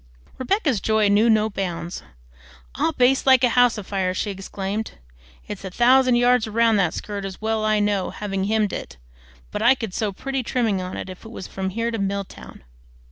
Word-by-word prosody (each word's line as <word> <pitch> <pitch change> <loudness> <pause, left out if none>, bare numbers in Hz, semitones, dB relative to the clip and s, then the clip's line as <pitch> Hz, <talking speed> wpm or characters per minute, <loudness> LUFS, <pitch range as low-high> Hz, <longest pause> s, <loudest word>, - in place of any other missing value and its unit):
Rebecca's 270 - 0
joy 220 -2 +2
knew 210 +3 +4
no 215 -1 +4
bounds. 180 -4 -4 0.7
"I'll 325 - 0
baste 265 -1 +2
like 260 -1 +6
a 250 - +5
house 245 -1 +3
afire!" 190 -2 -2
she 205 - -2
exclaimed. 195 +2 -5 0.5
"It's - - -7
a 190 - -5
thousand 250 +5 +4
yards 245 -1 +3
round 225 0 +2
that 180 -4 +1
skirt, 205 -1 -5
as 195 -1 -6
well 220 0 -1
I 215 0 +2
know, 205 -2 0
having 195 -2 -3
hemmed 215 -1 0
it; - - -7 0.5
but - - -4
I 240 +4 +5
could 225 -7 -6
sew 210 0 -1
pretty 270 +7 -3
trimming 225 -6 0
on 185 0 -6
if 185 -1 -8
it 225 - -10
was 220 - -8
from 190 0 -4
here 230 +4 -2
to 225 - -3
Milltown. 195 - -5
215 Hz, 190 wpm, -22 LUFS, 195-240 Hz, 0.7 s, like